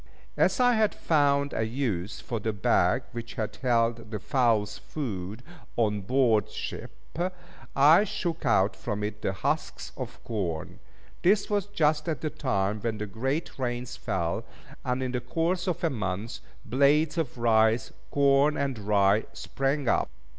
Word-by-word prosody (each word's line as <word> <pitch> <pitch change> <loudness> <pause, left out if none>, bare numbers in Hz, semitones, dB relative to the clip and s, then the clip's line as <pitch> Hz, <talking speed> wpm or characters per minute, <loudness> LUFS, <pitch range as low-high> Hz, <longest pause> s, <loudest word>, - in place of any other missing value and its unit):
As - - +2
I 245 -1 +5
had 220 -2 +2
found 140 -2 +2
a - - -1
use 110 -5 -2
for 115 - -3
the 110 +1 -2
bag 95 +2 +2
which 120 -1 -7
had 110 -3 -3
held 115 -2 +1
the 110 - -3
fowl's 110 -2 +1
food 110 -5 -5 0.3
on 105 -3 +1
board 115 0 +2
ship, - - -6 0.9
I 150 +8 +7
shook 170 -5 -3
out 95 +2 +3
from 105 -3 -4
it 105 0 -4
the - - 0
husks 95 - -2
of - - -6
corn. 90 -9 -3 0.4
This 200 +3 +3
was 205 -1 +1
just 155 -5 +1
at 155 - -2
the 155 - -2
time 100 -5 -1
when 115 0 -2
the 105 - -3
great 135 - -3
rains 125 0 -3
fell, 85 -8 -2 0.4
and 125 +1 -1
in 130 - -2
the 125 -1 -2
course 175 +6 -1
of 180 -2 -2
a 165 - +2
month, 110 -1 -3 0.3
blades 145 +7 +3
of 140 -6 -2
rice, 110 -1 +3 0.2
corn, 140 +1 +3
and 135 -4 -1
rye, 100 0 +3
sprang 135 0 -2
up. - - +2
120 Hz, 155 wpm, -28 LUFS, 105-145 Hz, 0.9 s, I